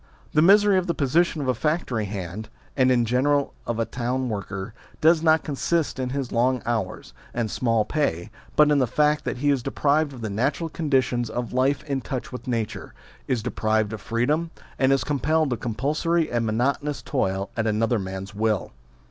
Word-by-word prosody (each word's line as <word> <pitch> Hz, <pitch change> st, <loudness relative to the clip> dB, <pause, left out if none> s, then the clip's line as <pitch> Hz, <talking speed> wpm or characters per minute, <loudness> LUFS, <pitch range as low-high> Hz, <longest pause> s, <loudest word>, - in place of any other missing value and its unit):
The 150 Hz, -, +4 dB
misery 200 Hz, +2 st, +6 dB
of 185 Hz, -, -4 dB
the 170 Hz, -, 0 dB
position 155 Hz, +3 st, +1 dB
of 135 Hz, -, -3 dB
a 130 Hz, -, +3 dB
factory 125 Hz, -4 st, -1 dB
hand, 100 Hz, +1 st, -6 dB, 0.3 s
and 130 Hz, -2 st, +4 dB
in 120 Hz, -2 st, +3 dB
general 140 Hz, +4 st, +1 dB
of 120 Hz, -, -1 dB
a 115 Hz, -, +1 dB
town 125 Hz, +2 st, -2 dB
worker, 100 Hz, 0 st, -5 dB, 0.3 s
does 160 Hz, +1 st, +5 dB
not 160 Hz, -1 st, +4 dB
consist 155 Hz, +1 st, -1 dB
in 130 Hz, -1 st, -1 dB
his 135 Hz, -1 st, -3 dB
long 125 Hz, +1 st, +1 dB
hours 110 Hz, -6 st, -3 dB, 0.2 s
and 115 Hz, -3 st, -1 dB
small 115 Hz, -3 st, +1 dB
pay, 110 Hz, -, -1 dB, 0.2 s
but 150 Hz, 0 st, +5 dB
in 145 Hz, -, +4 dB
the 130 Hz, -, +2 dB
fact 150 Hz, +4 st, +2 dB
that -, -, -2 dB
he 145 Hz, +3 st, +2 dB
is 135 Hz, -3 st, +1 dB
deprived 145 Hz, +4 st, +1 dB
of 130 Hz, -3 st, -10 dB
the 110 Hz, -, -3 dB
natural 140 Hz, -, -1 dB
conditions 130 Hz, -7 st, 0 dB
of 120 Hz, 0 st, -4 dB
life 130 Hz, +3 st, +1 dB
in 140 Hz, -3 st, -2 dB
touch 130 Hz, -2 st, -5 dB
with 125 Hz, -, -8 dB
nature, 115 Hz, -4 st, -3 dB, 0.3 s
is 120 Hz, -4 st, 0 dB
deprived 110 Hz, -3 st, 0 dB
of 110 Hz, -, -6 dB
freedom, 145 Hz, +9 st, 0 dB, 0.3 s
and 130 Hz, 0 st, +4 dB
is 135 Hz, -, +2 dB
compelled 150 Hz, +1 st, +1 dB
to -, -, +1 dB
compulsory 155 Hz, +9 st, 0 dB
and 120 Hz, -1 st, 0 dB
monotonous 140 Hz, +6 st, -1 dB
toil 95 Hz, -7 st, -1 dB
at 110 Hz, -1 st, 0 dB
another 110 Hz, +2 st, +1 dB
man's 95 Hz, +1 st, -6 dB
will. 110 Hz, -2 st, 0 dB
130 Hz, 190 wpm, -24 LUFS, 110-150 Hz, 0.3 s, misery